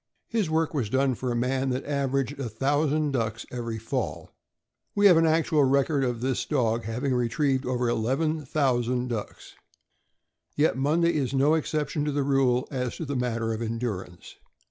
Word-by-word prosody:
His 220 -7 0
work 160 0 0
was 125 -9 -1
done 130 +2 +2
for 125 +1 -3
a - - -1
man 130 +2 0
that 130 +1 -2
aver 140 -1 0
aged 135 +2 -6
a 130 -4 -3
thousand 145 +5 +1
ducks 115 -4 -2
every 115 -2 -4
fall. 110 +1 -4 0.6
We 205 0 +3
have 190 -4 +8
an 165 0 +4
actual 155 -2 +3
record 140 +1 +2
of 120 -2 -2
this 130 0 0
dog 115 -6 0
having 125 +5 -1
retrieved 125 +2 0
over 125 -1 0
eleven 135 +8 0
thousand 125 -3 0
ducks. 110 -4 -6 1.0
Yet 150 +2 +2
Monday 160 +6 +2
is 140 -4 -1
no 140 +3 +4
exception 150 -2 -1
to 150 - 0
the 145 0 0
rule 135 -2 +2
as 125 -3 -2
to 165 - -4
the 140 -1 -3
matter 115 -2 -1
of 110 - -5
endurance. 110 -6 -5
135 Hz, 175 wpm, -26 LUFS, 120-145 Hz, 1.0 s, have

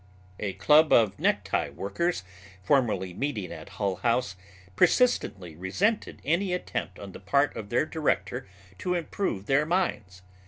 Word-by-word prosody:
A 100 -2 -2
club 150 - +5
of 105 -4 +4
necktie - - +1
workers 100 - -2 0.4
formerly 100 -6 +1
meeting 110 - -3
at 80 +1 -9
Hull 100 -3 -1
House 115 +3 0 0.4
persistently 100 - +2
resented 180 - -1
any 180 +5 +1
attempt 180 - -4
on 100 -1 -9
the - - -10
part 140 +10 +1
of 105 -2 -6
their 120 +5 +2
director 150 -6 -1 0.3
to 180 0 -1
improve 165 - -2
their 135 +5 +3
minds. 110 - -2
120 Hz, 140 wpm, -27 LUFS, 95-160 Hz, 0.4 s, club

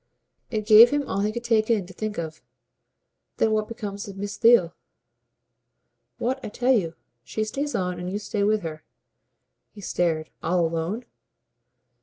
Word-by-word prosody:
It 215 -2 -2
gave 220 +2 +9
him 290 -1 -1
all 195 - -2
he 210 +1 +1
could 235 +2 -5
take 225 -2 +2
in 215 -5 +2
to 190 - -12
think 215 +2 -4
of. 160 -1 -5 1.0
"Then 220 - +2
what 215 0 +1
becomes 205 -4 -6
of 195 -1 -9
Miss 205 +1 -4
Theale?" 225 -8 +5 1.4
"What 260 +2 -2
I 215 - -4
tell 250 +5 +2
you. 170 -8 0 0.3
She 215 - -3
stays 280 +7 -3
on, 180 -1 -2
and 180 +1 -4
you 200 - -2
stay 205 0 -2
with 210 -1 +2
her." 155 -2 -6 0.9
He 205 - -13
stared. 165 -4 -1
"All 170 +1 +1
alone?" 165 +9 -2
210 Hz, 165 wpm, -25 LUFS, 180-225 Hz, 1.4 s, gave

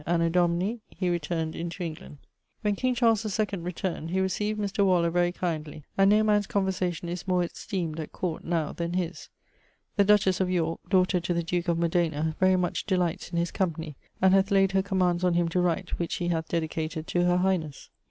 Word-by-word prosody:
Anno 170 0 +2
Domini... 180 +6 +1
he 180 -1 -2
returned 165 -1 -2
into 170 +2 -4
England. 155 -3 -7 0.4
When 210 -2 +1
king 255 +3 0
Charles 230 -3 +3 0.2
II 205 -3 0
returned, 170 -1 -4
he 185 - -1
recieved 210 +3 0
Mr. 200 0 0
Waller 175 -3 +3
very 175 0 +2
kindly, 155 -4 -4
and 195 0 +5
no 210 +1 +5
man's 210 -1 +2
conversation 185 -3 -1
is 175 +2 -5
more 180 -1 +2
esteemed 170 -3 -4
at 155 - -5
court 175 -4 -3
now 165 -3 -1
then 170 0 -3
his. 180 -1 -3 0.7
The 200 - +6
dutches 195 -2 +3
of 185 - +1
Yorke 165 -2 -1
(daughter 185 -1 +3
to 175 0 -2
the 170 - 0
duke 175 +1 -2
of 170 -1 +2
Modena) 160 -2 0
very 185 0 +4
much 180 -1 -1
delights 180 -4 0
his 170 0 -1
company, 165 -5 -2 0.2
and 190 0 +5
hath 195 0 +4
layed 195 -2 +4
her 195 0 +3
commands 185 -2 +1
on 180 -1 +3
him 175 -1 +2
to 180 +2 +1
write, 175 +1 0
which 170 - -2
he 175 -1 -2
hath 165 -1 -1
dedicated 160 -1 -2
to 175 +1 +1
her 180 0 +3
highnes. 180 -6 -1
175 Hz, 200 wpm, -27 LUFS, 170-190 Hz, 0.7 s, The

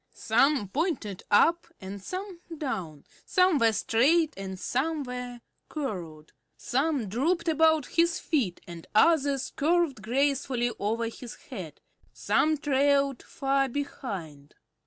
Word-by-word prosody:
Some 245 0 +2
pointed 260 - -2
up 330 +11 +4
and 195 +1 -8
some 370 - -6 0.2
down; 190 - -4 0.2
some 365 -5 +3
were 230 -1 +4
straight 290 +10 +2
and 190 -1 -6
some 295 +7 -1
were 250 -1 -6 0.3
curled; 175 - -5 0.3
some 270 -2 0
drooped 330 - 0
about 315 -2 +3
his 340 +4 +1
feet 245 - -1
and 170 -1 -10
others 285 0 +3
curved 320 -5 +1
gracefully 260 0 0
over 225 +3 -1
his 235 +1 -8 0.2
head; - - -7 0.3
some 310 0 +1
trailed 280 -1 +2
far 275 -1 0
behind. 190 - -6
270 Hz, 115 wpm, -28 LUFS, 215-310 Hz, 0.3 s, up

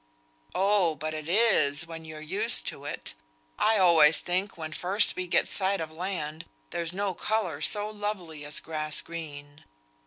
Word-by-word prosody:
"Oh! 195 -4 +2
but 155 +2 -4
it 155 0 -6
is 170 -8 +3
when 165 -1 -9
you're 155 -1 -9
used 105 - +4
to - - -10
it. - - -5 0.5
I 220 - +3
always 165 -5 +6
think 185 +2 -2
when 155 -1 -6
first 190 +5 +3
we 185 0 -4
get - - +2
sight 195 0 0
of 160 -1 -5
land, 160 -2 -5 0.3
there's 170 -1 -3
no 195 +1 -2
colour 180 -7 -2
so 205 +5 +2
lovely 205 -8 -5
as 145 0 -1
grass 155 -1 -2
green. 145 -3 -9
165 Hz, 160 wpm, -28 LUFS, 155-195 Hz, 0.5 s, always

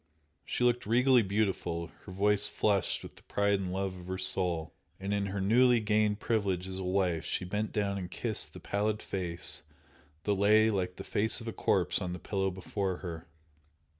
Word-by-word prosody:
She - - -2
looked 120 -2 +2
regally 125 +2 +5
beautiful, 95 -5 -1 0.2
her - - -7
face 105 +2 +3
flushed 100 -2 0
with - - -11
the - - -12
pride 100 -1 +1
and 95 -2 -3
love 95 0 -3
of 90 - -11
her 95 0 -3
soul, 90 -4 +1 0.3
and 100 +1 -2
in 100 -1 0
her 100 +1 -3
newly 120 +5 +4
gained 105 -1 +1
privilege 100 -6 0
as 95 0 -4
a - - -3
wife 90 -3 +1
she 90 - -2
bent 105 +4 -2
down 100 -2 -1
and 90 -2 -5
kissed - - -1
the - - -9
pallid 105 +1 -1
face 90 -5 -3 0.6
that 105 - +1
lay 105 +3 +4
like 90 -3 -1
the - - -7
face 110 +2 0
of 115 - -9
a 115 - -3
corpse - - +1
on 90 -1 -3
the 90 - -6
pillow 95 0 -1
before 95 0 -3
her. 80 -1 -6
100 Hz, 195 wpm, -31 LUFS, 90-105 Hz, 0.6 s, regally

